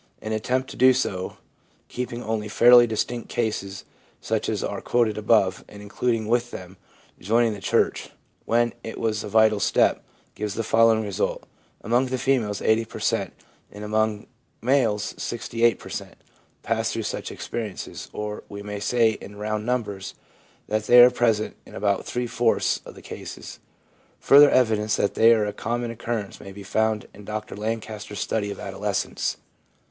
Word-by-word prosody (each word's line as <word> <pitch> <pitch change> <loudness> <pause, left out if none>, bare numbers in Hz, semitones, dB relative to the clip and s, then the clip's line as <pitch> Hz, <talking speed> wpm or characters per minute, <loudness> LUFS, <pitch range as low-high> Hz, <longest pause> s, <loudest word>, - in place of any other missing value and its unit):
An 110 - -6
attempt 125 +4 -1
to - - -9
do 130 +1 +6
so, 95 -8 -2 0.5
keeping 120 -1 -5
only 110 -1 -2
fairly 120 +3 +7
distinct 115 +2 -3
cases, 105 -4 -3 0.3
such - - -2
as - - -2
are - - -3
quoted 115 -3 +1
above, 105 -3 +2
and 100 - -12
including 110 +2 -1
with 120 +1 +1
them 95 -3 -9 0.2
' - - -29
joining 115 +4 +2
the 100 - -9
church/ - - 0 0.4
when 120 +1 +2
it 115 - -7
was 110 -2 -1
a - - -5
vital 110 -1 +4
step, - - +2 0.3
gives 105 -1 -4
the 115 - -1
following 115 0 +4
result: 100 -3 -2 0.4
among 120 +4 +1
the 130 0 -2
females 120 -6 0
80 110 +1 +3
per 110 - -10
cent, - - -1 0.4
and 105 +1 -9
among 110 0 0
the - - -21 0.4
males 115 -6 +2
68 115 0 0
per - - -12
cent, - - -6 0.5
pass - - 0
through - - -3
such - - -4
experiences; 110 -5 -6
or, 105 0 -5
we 100 0 -8
may 105 0 -5
say 115 +2 +3
in 105 - -10
round 105 +1 -3
numbers, 105 -6 -3 0.5
that 110 0 -1
they 125 - +8
are 125 +1 +9
present 115 -3 +1
in - - -14
about 100 -1 0
three 125 0 -2
fourths 115 -1 +1
of - - -11
the - - -13
cases. - - -9 0.6
Further 145 +1 +7
evidence 110 -4 +2
that 100 - 0
they 115 +1 +6
are 110 -2 +3
a 105 - -3
common 120 +1 -3
occurrence 115 -3 -4
may 100 - -10
be 100 +1 -10
found 110 +1 0
in 105 - -13
Dr 105 +1 -5
Lancaster's 110 -1 -5
study 105 -2 -1
of 100 - -6
adolescence. - - -2
110 Hz, 170 wpm, -24 LUFS, 105-120 Hz, 0.6 s, are